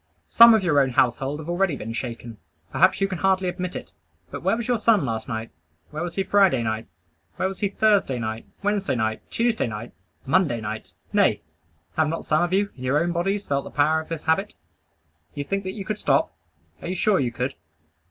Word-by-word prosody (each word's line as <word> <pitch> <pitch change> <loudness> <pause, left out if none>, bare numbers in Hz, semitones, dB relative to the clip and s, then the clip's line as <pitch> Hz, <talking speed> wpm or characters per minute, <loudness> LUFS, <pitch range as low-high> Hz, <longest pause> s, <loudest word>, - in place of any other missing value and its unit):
Some 235 -1 +8
of 215 - +1
your 150 -5 +3
own 135 -1 +3
household 130 +3 +1
have 155 - -10
already 175 -2 +1
been 115 -3 -6
shaken. 115 -2 -6 0.3
Perhaps - - +3
you 195 - +3
can 185 -3 -5
hardly 190 -1 +2
admit 180 0 -4
it; - - -7 0.4
but - - -6
where 225 - +1
was 235 - -4
your 245 -2 +1
son 215 -8 +3
last 110 -2 -3
night? 115 -3 -4 0.4
Where 150 +1 -5
was 175 -1 -4
he 195 - +1
Friday 190 -12 +3
night? 110 0 -3 0.5
Where 185 - 0
was 190 0 -6
he 205 - 0
Thursday 200 -10 +2
night? 110 -1 -4 0.2
Wednesday 200 -5 0
night? 110 -2 -1
Tuesday 230 - 0
night? 110 +2 -6 0.3
Monday 140 -4 +2
night? 110 0 -6 0.2
Nay, - - +3 0.5
have 160 -1 +3
not 165 - -4
some 155 +1 +2
of 175 0 0
you, 200 +2 +1
in 130 - -10
your 130 +3 +2
own 170 +2 0
bodies, 195 +4 -1
felt 140 -1 -1
the - - -8
power 155 +2 +2
of 160 - -14
this 165 -2 -5
habit? 195 +6 0 0.8
You 145 - -3
think 195 +7 -2
that 185 - -3
you 200 -3 -7
could 215 +1 -3
stop? - - +1 0.5
Are - - -6
you 185 - -2
sure 195 +1 +2
you 125 -3 0
could? 125 +3 -3
165 Hz, 215 wpm, -24 LUFS, 125-195 Hz, 0.8 s, Some